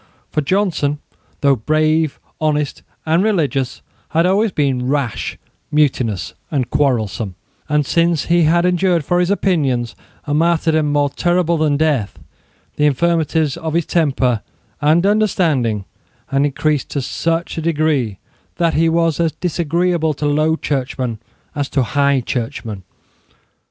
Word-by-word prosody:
For 150 Hz, -, 0 dB
Johnson, 160 Hz, -3 st, 0 dB, 0.4 s
though 140 Hz, -1 st, +4 dB
brave, 155 Hz, +4 st, +1 dB, 0.2 s
honest 150 Hz, -2 st, -1 dB, 0.2 s
and 160 Hz, +2 st, +2 dB
religious, 145 Hz, -, 0 dB, 0.3 s
had 165 Hz, +2 st, +2 dB
always 200 Hz, +4 st, +2 dB
been 135 Hz, -5 st, 0 dB
rash, 135 Hz, -4 st, -2 dB, 0.3 s
mutinous 130 Hz, -9 st, 0 dB, 0.2 s
and 135 Hz, -5 st, -2 dB
quarrelsome; 110 Hz, -8 st, 0 dB, 0.3 s
and, 150 Hz, -1 st, +2 dB
since 170 Hz, +1 st, +1 dB
he 170 Hz, -1 st, +3 dB
had 170 Hz, +3 st, +3 dB
endured 180 Hz, -3 st, +2 dB
for 175 Hz, +3 st, +1 dB
his 180 Hz, 0 st, +1 dB
opinions 145 Hz, -12 st, 0 dB, 0.3 s
a 145 Hz, -, -2 dB
martyrdom 160 Hz, -1 st, +2 dB
more 145 Hz, -1 st, +1 dB
terrible 175 Hz, +2 st, +1 dB
than 150 Hz, -2 st, +2 dB
death, 140 Hz, -, 0 dB, 0.6 s
the 150 Hz, -, +4 dB
infirmities 160 Hz, -1 st, +1 dB
of 160 Hz, -1 st, -4 dB
his 170 Hz, -2 st, +1 dB
temper 135 Hz, -8 st, +1 dB, 0.4 s
and 155 Hz, +5 st, +3 dB
understanding 160 Hz, -, +1 dB, 0.4 s
had 140 Hz, +1 st, +2 dB
increased 145 Hz, +1 st, -1 dB
to 140 Hz, -, -2 dB
such 165 Hz, +4 st, -2 dB
a -, -, -3 dB
degree 150 Hz, -, 0 dB, 0.4 s
that 170 Hz, -1 st, +1 dB
he 165 Hz, +1 st, +3 dB
was 165 Hz, -1 st, +1 dB
as 165 Hz, -2 st, +1 dB
disagreeable 170 Hz, -2 st, 0 dB
to 150 Hz, -, -3 dB
Low 155 Hz, +2 st, +2 dB
Churchmen 130 Hz, -6 st, -2 dB, 0.3 s
as 145 Hz, -3 st, -2 dB
to 135 Hz, -, +1 dB
High 140 Hz, +1 st, +2 dB
Churchmen. 115 Hz, -4 st, -4 dB
155 Hz, 135 wpm, -18 LUFS, 135-170 Hz, 0.6 s, though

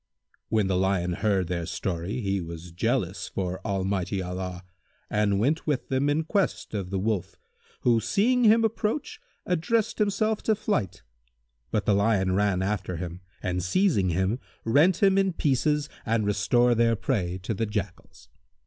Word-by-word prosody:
When 110 Hz, -2 st, +2 dB
the 95 Hz, -1 st, +1 dB
Lion 90 Hz, -2 st, +1 dB
heard 95 Hz, -2 st, +1 dB
their 85 Hz, -1 st, -3 dB
story, 95 Hz, +6 st, -3 dB
he 100 Hz, -2 st, -1 dB
was 85 Hz, 0 st, -8 dB
jealous 100 Hz, 0 st, -1 dB
for 95 Hz, -1 st, -3 dB
Almighty 95 Hz, -2 st, -1 dB
Allah[FN#158] 90 Hz, 0 st, -4 dB, 0.5 s
and 105 Hz, -1 st, +2 dB
went 145 Hz, +10 st, 0 dB
with 145 Hz, -4 st, -1 dB
them 135 Hz, +2 st, +1 dB
in 150 Hz, +2 st, +1 dB
quest 190 Hz, -, -1 dB
of 100 Hz, -4 st, -3 dB
the 95 Hz, -, -2 dB
Wolf 105 Hz, -1 st, -1 dB, 0.5 s
who, 120 Hz, -2 st, +4 dB
seeing 215 Hz, -, +2 dB
him 225 Hz, +1 st, +6 dB
approach 225 Hz, +5 st, -2 dB, 0.2 s
addressed 200 Hz, +6 st, 0 dB
himself 215 Hz, +1 st, +1 dB
to 220 Hz, -, +2 dB
flight; 200 Hz, -, -2 dB, 0.7 s
but 105 Hz, -3 st, -1 dB
the 105 Hz, -, +3 dB
Lion 100 Hz, -2 st, +2 dB
ran 95 Hz, -1 st, +1 dB
after 95 Hz, -3 st, -2 dB
him 85 Hz, +1 st, -6 dB, 0.2 s
and 90 Hz, 0 st, -1 dB
seizing 100 Hz, -, +2 dB
him, 95 Hz, +7 st, 0 dB, 0.3 s
rent 160 Hz, -, +4 dB
him 195 Hz, 0 st, +5 dB
in 195 Hz, -2 st, +1 dB
pieces 150 Hz, 0 st, +1 dB, 0.2 s
and 110 Hz, -1 st, 0 dB
restored 120 Hz, +4 st, +2 dB
their 115 Hz, -1 st, +4 dB
prey 95 Hz, -7 st, -1 dB
to 110 Hz, -, -2 dB
the 110 Hz, +2 st, -1 dB
Jackals. 100 Hz, -3 st, -6 dB
105 Hz, 160 wpm, -26 LUFS, 95-145 Hz, 0.7 s, him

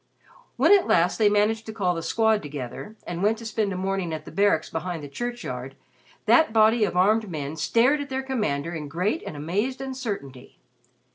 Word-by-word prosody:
When -, -, +4 dB
at 400 Hz, -3 st, +6 dB
last 175 Hz, +5 st, +2 dB
they 210 Hz, -2 st, +5 dB
managed 215 Hz, +2 st, +1 dB
to -, -, -4 dB
call 190 Hz, -5 st, 0 dB
The 165 Hz, -, -4 dB
Squad 220 Hz, +3 st, +2 dB
together, 145 Hz, -, -7 dB
and 175 Hz, 0 st, -5 dB
went 215 Hz, +3 st, +2 dB
to 230 Hz, -, -10 dB
spend 215 Hz, -2 st, -1 dB
a 185 Hz, -, -3 dB
morning 190 Hz, -2 st, -2 dB
at 155 Hz, 0 st, -8 dB
the -, -, -9 dB
Barracks 200 Hz, -5 st, +2 dB
behind 165 Hz, -1 st, -4 dB
the -, -, -6 dB
churchyard, 140 Hz, -, -5 dB, 0.5 s
that 320 Hz, -7 st, +5 dB
body 220 Hz, +1 st, +4 dB
of 180 Hz, -, -3 dB
armed 215 Hz, +3 st, +3 dB
men 150 Hz, -2 st, -4 dB
stared 240 Hz, -, +2 dB
at 285 Hz, -, -6 dB
their 265 Hz, 0 st, -2 dB
commander 175 Hz, -, -2 dB
in 155 Hz, -3 st, -5 dB
great 185 Hz, -, -1 dB
and 150 Hz, -, -6 dB
amazed 205 Hz, -, -2 dB
uncertainty. 215 Hz, -, -6 dB
200 Hz, 195 wpm, -25 LUFS, 160-225 Hz, 0.5 s, at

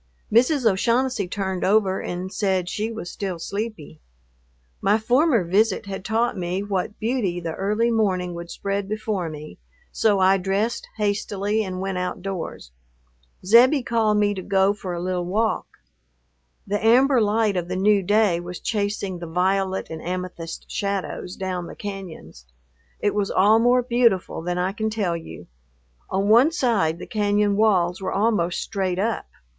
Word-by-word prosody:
Mrs. 255 Hz, +3 st, +3 dB
O'Shaughnessy 230 Hz, +1 st, +1 dB
turned 190 Hz, -1 st, -3 dB
over 195 Hz, -1 st, +2 dB
and 185 Hz, +2 st, -5 dB
said 190 Hz, -3 st, 0 dB
she 215 Hz, +5 st, -2 dB
was 220 Hz, -6 st, -6 dB
still 190 Hz, -3 st, -4 dB
sleepy. 200 Hz, -, -5 dB, 0.8 s
My 205 Hz, +2 st, +3 dB
former 245 Hz, -, +3 dB
visit 200 Hz, +4 st, +1 dB
had 195 Hz, -1 st, -6 dB
taught 225 Hz, +2 st, 0 dB
me 180 Hz, +1 st, -2 dB
what 205 Hz, 0 st, -3 dB
beauty 220 Hz, -6 st, -1 dB
the 165 Hz, -2 st, -4 dB
early 210 Hz, +6 st, 0 dB
morning 185 Hz, -5 st, 0 dB
would 170 Hz, 0 st, -7 dB
spread 200 Hz, +1 st, -3 dB
before 215 Hz, -5 st, -2 dB
me, 155 Hz, 0 st, -9 dB, 0.3 s
so 210 Hz, -3 st, +2 dB
I 190 Hz, +1 st, +4 dB
dressed 195 Hz, +5 st, -1 dB
hastily 205 Hz, 0 st, -1 dB
and 185 Hz, -2 st, -5 dB
went 190 Hz, -1 st, -2 dB
outdoors. 180 Hz, -, -5 dB, 0.7 s
Zebbie 250 Hz, +7 st, +6 dB
called 220 Hz, -3 st, +1 dB
me 205 Hz, 0 st, +2 dB
to 190 Hz, -, -5 dB
go 195 Hz, +1 st, +2 dB
for 190 Hz, -3 st, -6 dB
a 170 Hz, -, -4 dB
little 180 Hz, 0 st, -2 dB
walk. 220 Hz, +4 st, 0 dB, 1.0 s
The 205 Hz, +1 st, -2 dB
amber 250 Hz, +3 st, +5 dB
light 210 Hz, -1 st, +2 dB
of 175 Hz, -1 st, -2 dB
the 180 Hz, -, -3 dB
new 200 Hz, +2 st, +3 dB
day 205 Hz, -2 st, +2 dB
was 175 Hz, +1 st, -7 dB
chasing 200 Hz, -3 st, -2 dB
the 170 Hz, -, -6 dB
violet 190 Hz, +2 st, 0 dB
and 160 Hz, -1 st, -6 dB
amethyst 180 Hz, -2 st, -5 dB
shadows 200 Hz, -2 st, -3 dB
down 185 Hz, -2 st, -4 dB
the -, -, -9 dB
cañons. 180 Hz, -, -8 dB, 0.6 s
It 205 Hz, -, +1 dB
was 205 Hz, -1 st, 0 dB
all 210 Hz, +4 st, +4 dB
more 245 Hz, +2 st, +4 dB
beautiful 235 Hz, -9 st, +1 dB
than 175 Hz, +1 st, -2 dB
I 180 Hz, +1 st, 0 dB
can 220 Hz, +1 st, -2 dB
tell 205 Hz, -6 st, -1 dB
you. 80 Hz, -, -9 dB, 0.6 s
On 195 Hz, +1 st, 0 dB
one 240 Hz, +9 st, +6 dB
side 225 Hz, -, +1 dB
the -, -, -8 dB
cañon 205 Hz, -1 st, +1 dB
walls 190 Hz, -4 st, +2 dB
were 185 Hz, -, -2 dB
almost 195 Hz, -5 st, +1 dB
straight 185 Hz, -2 st, -2 dB
up. 215 Hz, +3 st, -1 dB
200 Hz, 160 wpm, -23 LUFS, 180-220 Hz, 1.0 s, Zebbie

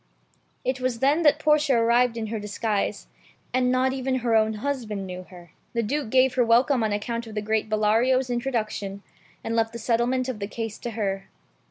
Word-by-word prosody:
It 255 Hz, 0 st, -1 dB
was 255 Hz, -2 st, 0 dB
then 280 Hz, +7 st, +2 dB
that 300 Hz, -2 st, +5 dB
Portia 300 Hz, -2 st, +3 dB
arrived 235 Hz, +1 st, +3 dB
in 225 Hz, -, -2 dB
her 220 Hz, -, -2 dB
disguise, 210 Hz, 0 st, -2 dB, 0.5 s
and 250 Hz, 0 st, +2 dB
not 260 Hz, +1 st, +2 dB
even 265 Hz, 0 st, -1 dB
her 230 Hz, -1 st, +3 dB
own 220 Hz, 0 st, +3 dB
husband 220 Hz, -5 st, -3 dB
knew 185 Hz, 0 st, -7 dB
her. 175 Hz, -3 st, -14 dB, 0.2 s
The 235 Hz, -1 st, 0 dB
Duke 275 Hz, +2 st, -2 dB
gave 260 Hz, +1 st, +4 dB
her 250 Hz, -, +3 dB
welcome 240 Hz, +3 st, +3 dB
on 215 Hz, -, 0 dB
account 230 Hz, +3 st, -3 dB
of 220 Hz, -, -9 dB
the 210 Hz, -, -1 dB
great 220 Hz, 0 st, 0 dB
Bellario's 235 Hz, +4 st, +2 dB
introduction, 215 Hz, -5 st, -3 dB, 0.4 s
and 225 Hz, -, -2 dB
left 225 Hz, 0 st, +1 dB
the -, -, -5 dB
settlement 240 Hz, +3 st, 0 dB
of 255 Hz, -5 st, -4 dB
the 200 Hz, -, -3 dB
case 225 Hz, 0 st, -5 dB
to 240 Hz, -, -5 dB
her. 195 Hz, -2 st, -2 dB
230 Hz, 195 wpm, -25 LUFS, 215-255 Hz, 0.5 s, that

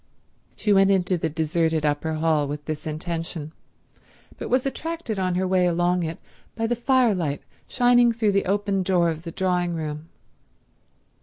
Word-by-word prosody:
She 210 Hz, -, +1 dB
went 195 Hz, 0 st, +5 dB
into 185 Hz, -1 st, +2 dB
the 165 Hz, -1 st, -1 dB
deserted 160 Hz, 0 st, 0 dB
upper 150 Hz, +2 st, 0 dB
hall 155 Hz, -2 st, +1 dB
with 145 Hz, +1 st, -6 dB
this 155 Hz, 0 st, -5 dB
intention, 165 Hz, 0 st, -4 dB, 0.9 s
but -, -, -5 dB
was 255 Hz, +1 st, +2 dB
attracted 315 Hz, -, -3 dB
on 185 Hz, -1 st, 0 dB
her 185 Hz, +1 st, 0 dB
way 185 Hz, -1 st, +3 dB
along 175 Hz, +1 st, +1 dB
it 165 Hz, -1 st, -3 dB, 0.4 s
by 225 Hz, -, -1 dB
the 240 Hz, +2 st, 0 dB
firelight 225 Hz, -, +1 dB, 0.2 s
shining 245 Hz, -1 st, +4 dB
through 225 Hz, -2 st, +1 dB
the 200 Hz, 0 st, +1 dB
open 200 Hz, 0 st, 0 dB
door 180 Hz, -2 st, +2 dB
of 160 Hz, 0 st, -6 dB
the 165 Hz, 0 st, -7 dB
drawing 180 Hz, -1 st, 0 dB
room. 155 Hz, 0 st, -5 dB
180 Hz, 160 wpm, -24 LUFS, 160-205 Hz, 0.9 s, went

